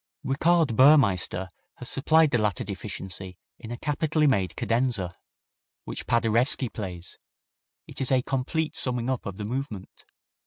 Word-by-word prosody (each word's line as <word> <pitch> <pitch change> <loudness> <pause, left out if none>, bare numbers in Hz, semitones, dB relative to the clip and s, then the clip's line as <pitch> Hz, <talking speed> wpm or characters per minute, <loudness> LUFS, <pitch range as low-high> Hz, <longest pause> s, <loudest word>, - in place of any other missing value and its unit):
Richard 155 0 +2
Burmeister 100 - +4 0.3
has - - -8
supplied 155 +2 +3
the 120 - +2
latter 105 -4 0
deficiency 95 -2 -7 0.2
in 115 - -10
a 120 - -5
capitally 150 +3 0
made 100 -10 +1
cadenza, 115 -7 0 0.7
which - - -7
Paderewski 120 +3 +2
plays. 90 -5 -7 0.7
It - - -9
is 130 - +1
a 130 -1 +3
complete 145 +5 -2
summing 125 0 +1
up 125 -4 -3
of 100 -2 -6
the 105 - -5
movement. 115 -4 -6
120 Hz, 140 wpm, -26 LUFS, 100-135 Hz, 0.7 s, Burmeister